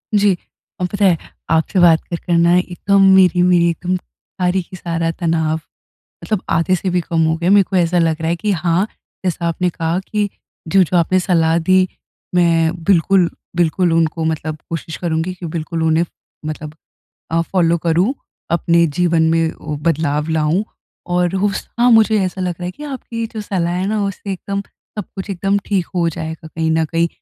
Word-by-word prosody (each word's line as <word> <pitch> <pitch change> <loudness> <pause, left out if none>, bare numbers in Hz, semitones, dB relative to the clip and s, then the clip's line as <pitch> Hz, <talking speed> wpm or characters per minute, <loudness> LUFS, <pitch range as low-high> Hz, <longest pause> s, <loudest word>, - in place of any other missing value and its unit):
जी। 200 -3 +3 0.4
और 180 - 0
पता 200 +1 0
है, 175 -3 +4 0.3
आपसे 165 +4 +1
बात 170 -2 +5
कर 170 - -2
कर 175 - 0
ना 170 0 +4
है 180 +1 +5
एकदम 195 +2 +1
मेरी 180 -2 +5
मेरी 175 -1 +4
एकदम 180 +2 -2
सारी 180 +1 -3
की 185 - -12
सारा 165 -1 -2
तनाव 160 -2 0 0.7
मतलब 215 -4 -2
आधे 180 +2 +2
से 185 +1 -2
भी 180 0 +1
कम 165 -1 0
हो 160 0 +1
गया 175 +2 0
है। - - +6
मेरे 200 -1 +6
को 195 - -2
ऐसा 175 0 +2
लग 165 -1 +2
रहा 160 - 0
है 170 - +1
कि 210 +4 -1
हाँ, 175 +2 +1 0.4
जैसा 175 -1 -1
आपने 180 +2 0
कहा 165 +2 -1
कि 205 +1 -2 0.4
जो-जो 185 0 +3
आपने 185 +2 +3
सलाह 165 -3 +2
दी, 185 +2 +3 0.5
मैं 165 -2 +3
बिल्कुल, 185 0 +3 0.3
बिल्कुल 175 0 +2
उनको 165 0 +1
मतलब 155 -1 -2
कोशिश 165 -1 -5
करुँगी 170 +1 -2
कि 180 -1 -9
बिल्कुल 165 0 -3
उन्हें 160 +1 +3
फ 175 - -8 0.4
मतलब 155 0 -5 0.6
अ, 165 - +2
फ़ॉलो 170 -1 +1
करूँ, 175 - +1 0.4
अपने 170 0 +3
जीवन 165 +1 +1
में 165 0 +1
वो 150 -1 -4
बदलाव 155 -2 0
लाऊँ। 160 +5 +1 0.5
और 180 +1 +1
उस 195 0 -1
हाँ, 245 +1 +5
मुझे 220 -1 +5
ऐसा 185 +1 -4
लग 180 -1 -1
रहा 175 - -6
है 180 - -2
कि 295 +11 -10
आपकी 255 -4 -6
ये 225 - -1
जो 220 - -3
सलाह 180 -4 -1
है 185 +2 -1
ना, 215 0 0
उससे 195 0 -4
एकदम 200 +2 -4 0.4
सब 205 - -2
कुछ 195 +1 -5
एकदम 195 +2 0
ठीक 190 -4 0
हो 170 -2 +2
जाएगा 160 0 -6
कहीं 160 0 0
न 160 0 +2
कहीं, 165 +2 0
175 Hz, 195 wpm, -18 LUFS, 165-185 Hz, 0.7 s, है